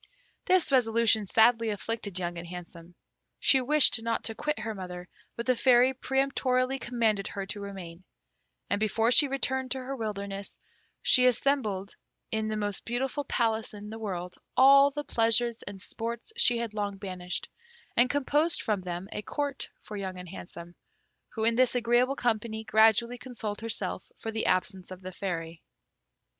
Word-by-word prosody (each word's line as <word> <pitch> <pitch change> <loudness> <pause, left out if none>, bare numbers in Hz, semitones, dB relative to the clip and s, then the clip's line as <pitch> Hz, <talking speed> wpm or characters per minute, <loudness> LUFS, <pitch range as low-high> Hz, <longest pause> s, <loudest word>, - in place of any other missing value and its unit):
This 365 -5 +3
resolution 225 -4 +3
sadly 230 +2 +4
afflicted 210 -2 -3
Young 175 -1 -3
and 170 - -8
Handsome. 175 -1 -10 0.4
She 265 - +5
wished 280 -3 +4
not 230 0 -2
to 225 - -1
quit 300 +5 -2
her 220 0 -4
mother; 180 -2 -7 0.3
but 235 - -5
the 255 - +3
Fairy 250 +1 +5
peremptorily 265 0 0
commanded 225 -5 0
her 195 -1 -5
to 205 +1 -6
remain; 185 -3 -8 0.6
and 200 - 0
before 225 +2 +2
she 290 +3 +7
returned 265 -1 -1
to 265 - 0
her 260 +1 -5
wilderness, 200 -3 -5 0.5
she 255 0 +6
assembled 225 -6 0 0.4
in 220 0 -1
the 215 0 -2
most 205 -2 -3
beautiful 265 +4 -2
palace 225 -2 -1
in 210 +1 -9
the 225 - -7
world 180 -4 -5 0.2
all 275 +2 +8
the 295 +1 -5
pleasures 235 -2 +1
and 200 -1 -7
sports 235 - -5
she 245 - +4
had 230 -2 -3
long 205 -2 -3
banished, 185 -2 -4 0.5
and 245 +2 +4
composed 295 +3 +1
from 210 -5 0
them 180 +1 -5
a - - -4
Court 285 +4 -3
for 210 - -8
Young 190 -2 -5
and 180 -1 -9
Handsome, 170 -1 -9 0.6
who 220 - -4
in 230 +1 +3
this 250 +1 +3
agreeable 245 +2 +2
company 220 -3 -1
gradually 220 +2 +3
consoled 235 -5 -5
herself 205 -5 -3
for 225 - -5
the 220 0 -2
absence 185 0 0
of 185 0 -9
the 185 0 -7
Fairy. 165 -4 -5
225 Hz, 165 wpm, -28 LUFS, 195-250 Hz, 0.6 s, all